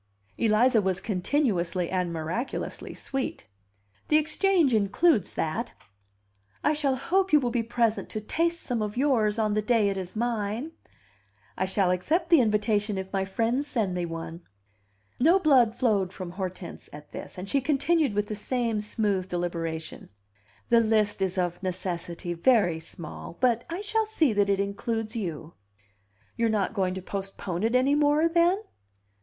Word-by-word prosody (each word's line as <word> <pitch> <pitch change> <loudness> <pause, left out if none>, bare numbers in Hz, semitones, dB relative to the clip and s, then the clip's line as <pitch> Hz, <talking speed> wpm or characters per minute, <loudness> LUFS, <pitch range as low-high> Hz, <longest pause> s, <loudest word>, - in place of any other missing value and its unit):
Eliza 225 +1 +4
was 190 -2 -1
continuously 185 - 0
and 180 -2 0
miraculously 170 - -4
sweet. 270 - -4 0.6
"The 305 - +5
Exchange 310 -1 +2
includes 215 - +2
that." 165 +10 -2 0.9
"I 300 - +3
shall 285 -3 0
hope 375 +8 0
you 300 - +7
will 245 -3 -1
be 235 -1 +1
present 230 -1 0
to 215 - -3
taste 335 +10 -1
some 240 -3 -2
of 210 +1 -3
yours 235 -6 +2
on 215 -2 +1
the 215 - +1
day 210 -1 +2
it 195 -1 -2
is 185 +1 -7
mine." 230 +4 -2 0.8
"I 190 - 0
shall 190 -1 +2
accept 330 - 0
the 330 -5 +7
invitation 210 -2 +1
if 190 +1 -6
my 195 -1 0
friends 230 +8 0
send 220 -10 -1
me 175 -1 -2
one." 165 +1 -6 0.8
No 330 +9 +5
blood 260 - +4
flowed 205 -7 +1
from 185 -3 -7
Hortense 185 -1 -6
at 150 0 -12
this, - - -8
and 185 +2 -6
she 275 +7 +1
continued 295 -2 +1
with 205 0 +1
the 215 - -5
same 230 0 -1
smooth 205 -3 -1
deliberation. 165 -2 -4 0.6
"The 235 - +6
list 215 -3 +2
is 190 0 0
of 175 -1 -1
necessity 175 -2 -3
very 175 -3 +3
small; 165 +1 -9
but 240 -2 +2
I 340 +4 -4
shall 440 +1 0
see 320 - +2
that 205 -1 +2
it 195 -1 +2
includes 215 +3 -2
you." 170 -6 -4 0.8
"You 230 - +1
are - - 0
not 210 -3 0
going 185 -3 0
to 190 - -6
postpone 195 -2 -4
it 225 +3 +1
any 260 +3 +4
more, 295 +2 +3
then?" 345 +4 +2
215 Hz, 160 wpm, -27 LUFS, 185-260 Hz, 0.9 s, you